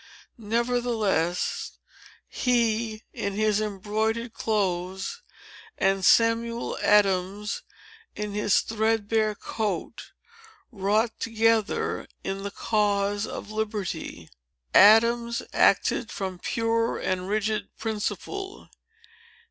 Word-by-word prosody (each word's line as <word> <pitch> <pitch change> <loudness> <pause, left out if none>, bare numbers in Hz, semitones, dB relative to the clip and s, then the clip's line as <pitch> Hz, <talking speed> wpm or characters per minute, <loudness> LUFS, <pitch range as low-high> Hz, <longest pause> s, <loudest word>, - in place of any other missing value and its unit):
Nevertheless, 225 -6 -1 0.5
he, 230 -3 0
in 200 - -3
his 215 0 +1
embroidered 215 +3 -2
clothes, 190 - -2 0.6
and 195 0 +1
Samuel 230 +2 +3
Adams 200 0 +2 0.5
in 210 -1 -4
his 205 -1 +2
threadbare 220 -1 0
coat, 205 -4 -4 0.6
wrought 215 +2 +1
together 225 -1 +1 0.2
in 195 0 -3
the 200 - -4
cause 205 -1 0
of 210 - -7
liberty. 205 - -4 0.5
Adams 235 +3 +5
acted 230 - +3
from 190 -2 -5
pure 230 +3 0
and 185 0 -2
rigid 215 -1 -1
principle. 225 - -4
215 Hz, 85 wpm, -26 LUFS, 200-230 Hz, 0.6 s, Adams